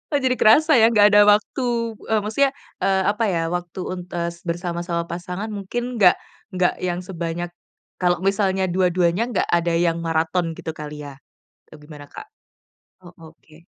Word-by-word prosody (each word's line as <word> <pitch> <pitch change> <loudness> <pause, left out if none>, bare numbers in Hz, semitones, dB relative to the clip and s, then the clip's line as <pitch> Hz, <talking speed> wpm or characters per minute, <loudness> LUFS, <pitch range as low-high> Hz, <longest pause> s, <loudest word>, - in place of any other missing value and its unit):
Oh, - - +3
jadi 255 -1 +1
kerasa 305 +9 +5
ya 225 - +7
nggak 210 -2 +5
ada 205 0 +7
waktu, 210 +5 +2 0.4
eee, 220 -1 +2
maksudnya, 265 +6 +1 0.3
eee, 190 -1 +1
apa 210 +2 -2
ya, 175 -4 0
waktu 175 0 -4
untuk, 180 -1 -6
eee, 170 0 -2 0.2
bersama-sama 170 0 -3
pasangan 180 +5 -6
mungkin 240 +4 -4
nggak 185 -3 +6 0.4
nggak 180 -1 +2
yang 180 0 -3
sebanyak, 175 -1 -5 0.5
kalo 180 -1 +1
misalnya 195 -1 +1
dua-duanya 180 +3 +1
nggak - - +1
ada 170 0 +1
yang 170 0 +1
marathon 165 +1 -1
gitu 160 - -6
kali 150 -1 -8
ya? 140 -2 -10 0.6
Eee, - - -12
gimana, 150 -1 -12
Kak? 420 - -12 0.8
Oh, 175 - -13 0.2
oke. 160 +2 -21
180 Hz, 160 wpm, -22 LUFS, 170-205 Hz, 0.8 s, ya